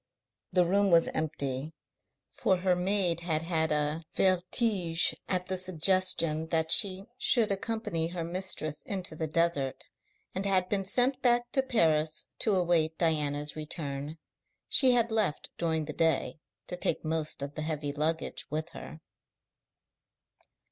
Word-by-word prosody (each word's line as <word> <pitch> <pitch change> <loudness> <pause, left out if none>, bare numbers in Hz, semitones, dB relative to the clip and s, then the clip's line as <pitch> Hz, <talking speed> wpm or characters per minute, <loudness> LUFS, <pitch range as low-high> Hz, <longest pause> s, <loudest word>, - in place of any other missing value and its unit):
The 180 -1 +3
room 200 +3 +2
was 170 -2 +4
empty, 145 -1 -3 0.6
for 190 - +1
her 180 0 +1
maid 180 -1 +1
had 165 -2 -1
had 160 -2 0
a 150 +2 0
vertige 185 -1 +2 0.2
at 180 -1 -1
the 185 0 -2
suggestion 170 -3 +1
that 160 -1 0
she 195 -2 +3
should 225 -4 +3
accompany 200 -5 -2
her 170 0 -5
mistress 170 -3 -3
into 185 -5 -4
the 160 0 -3
desert, 155 -4 0 0.5
and 190 - -2
had 190 -2 +2
been 195 -2 -1
sent 255 +6 +2
back 240 -1 +2
to 265 - +3
Paris 160 -11 +1
to 215 -3 +3
await 170 -3 +1
Diana's 150 -3 0
return. 150 -1 -5 0.5
She 260 -3 +5
had 235 -1 +2
left 215 -9 0
during 160 -2 0
the 150 - -6
day, 165 0 0 0.3
to - - -3
take 180 - -1
most 155 -2 -1
of 140 +1 -6
the 155 - -5
heavy 155 -2 -3
luggage 155 +2 -2
with 155 +2 -3
her. 160 -1 -10
170 Hz, 140 wpm, -29 LUFS, 155-190 Hz, 0.6 s, She